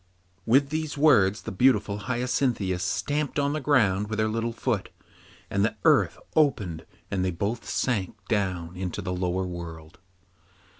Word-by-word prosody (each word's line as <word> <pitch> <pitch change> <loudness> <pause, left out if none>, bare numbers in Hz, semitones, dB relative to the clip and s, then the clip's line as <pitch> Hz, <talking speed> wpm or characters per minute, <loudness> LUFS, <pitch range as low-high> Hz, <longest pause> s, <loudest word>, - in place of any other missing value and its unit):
With 135 +4 +4
these 155 -1 -3
words 105 - +4
the - - -5
beautiful 105 -2 +2
Hyacinthia 120 -4 0
stamped 145 +12 -1
on 140 0 +1
the 155 - -2
ground 105 -8 +2
with 110 - -3
her 110 0 +2
little 115 +2 -1
foot, 115 -3 -2 0.6
and 100 0 0
the 110 0 0
earth - - +4 0.2
opened 105 - +1 0.2
and 95 -2 0
they 95 - +1
both 100 +5 -3
sank 105 -2 -1
down 90 -5 -1
into 90 -1 -4
the 90 - -2
lower 90 +1 -1
world. 85 -1 -8
105 Hz, 150 wpm, -26 LUFS, 95-125 Hz, 0.6 s, With